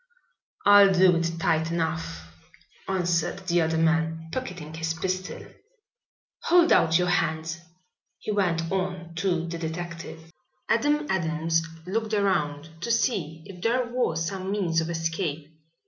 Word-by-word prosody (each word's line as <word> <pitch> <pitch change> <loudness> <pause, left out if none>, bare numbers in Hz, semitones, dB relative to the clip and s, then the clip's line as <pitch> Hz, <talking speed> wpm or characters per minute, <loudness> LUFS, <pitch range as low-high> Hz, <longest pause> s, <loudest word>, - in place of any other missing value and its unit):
"I'll 205 -1 +8
do 185 -1 +5
it 170 0 -1
tight 160 0 +1
enough," 160 - -2 0.6
answered 180 0 0
the 175 -1 +2
other 160 0 +1
man, 160 0 +1
pocketing 180 -12 -5
his 165 0 -2
pistol. 185 +3 -3 1.0
"Hold 345 0 +5
out 160 0 +5
your 180 0 +1
hands," 160 -2 0 0.6
he - - -4
went 170 -5 0
on 185 -3 -3
to 175 -2 0
the 170 0 -5
detective. 165 0 -6 0.4
Adam 295 +5 +2
Adams 165 -2 0 0.2
looked 220 +3 -1
around 160 -7 0
to 235 - -3
see 170 - 0
if 190 -3 -11
there 245 +4 +1
was 165 -10 0
some 190 +1 -4
means 180 -5 +1
of 165 - -3
escape. 165 -2 -3
170 Hz, 130 wpm, -26 LUFS, 160-190 Hz, 1.0 s, I'll